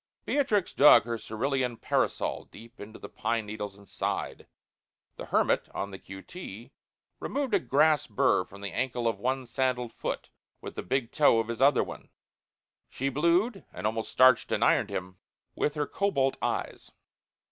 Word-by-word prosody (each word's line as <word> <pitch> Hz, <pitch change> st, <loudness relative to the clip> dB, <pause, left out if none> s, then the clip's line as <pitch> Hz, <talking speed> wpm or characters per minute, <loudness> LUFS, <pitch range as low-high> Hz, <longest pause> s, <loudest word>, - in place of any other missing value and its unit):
Beatrix 215 Hz, -10 st, +1 dB
dug 145 Hz, +2 st, +8 dB
her 115 Hz, -1 st, -4 dB
cerulean 125 Hz, +2 st, -2 dB
parasol -, -, -1 dB
deep 115 Hz, +2 st, -15 dB
into 110 Hz, +2 st, -9 dB
the -, -, -9 dB
pine 115 Hz, -2 st, -2 dB
needles 105 Hz, -1 st, -6 dB
and 100 Hz, 0 st, -17 dB
sighed. -, -, -4 dB, 0.7 s
The -, -, -8 dB
hermit, -, -, +1 dB
on 100 Hz, -, -3 dB
the 95 Hz, -, -8 dB
q. 95 Hz, 0 st, -10 dB
t., 120 Hz, -, -9 dB, 0.5 s
removed 275 Hz, -4 st, -2 dB
a 200 Hz, -, +5 dB
grass 150 Hz, -1 st, +3 dB
burr 105 Hz, -3 st, +2 dB
from 100 Hz, +2 st, -14 dB
the 100 Hz, -1 st, -4 dB
ankle 120 Hz, -2 st, -1 dB
of 110 Hz, -4 st, -1 dB
one 130 Hz, +3 st, -1 dB
sandalled 125 Hz, -1 st, -1 dB
foot -, -, -5 dB, 0.3 s
with -, -, -8 dB
the -, -, -5 dB
big 120 Hz, +4 st, -1 dB
toe 145 Hz, -6 st, +4 dB
of 115 Hz, 0 st, -2 dB
his 115 Hz, +2 st, -4 dB
other 140 Hz, 0 st, +5 dB
one. -, -, -10 dB, 0.8 s
She 135 Hz, +2 st, -2 dB
blued 170 Hz, -, +1 dB
and 90 Hz, -, -7 dB
almost 110 Hz, +1 st, -2 dB
starched 130 Hz, -1 st, +5 dB
and -, -, +1 dB
ironed -, -, +3 dB
him 95 Hz, 0 st, -5 dB, 0.4 s
with 150 Hz, -, -1 dB
her 150 Hz, -1 st, 0 dB
cobalt 140 Hz, -10 st, 0 dB
eyes. -, -, -3 dB
125 Hz, 170 wpm, -28 LUFS, 110-145 Hz, 0.8 s, dug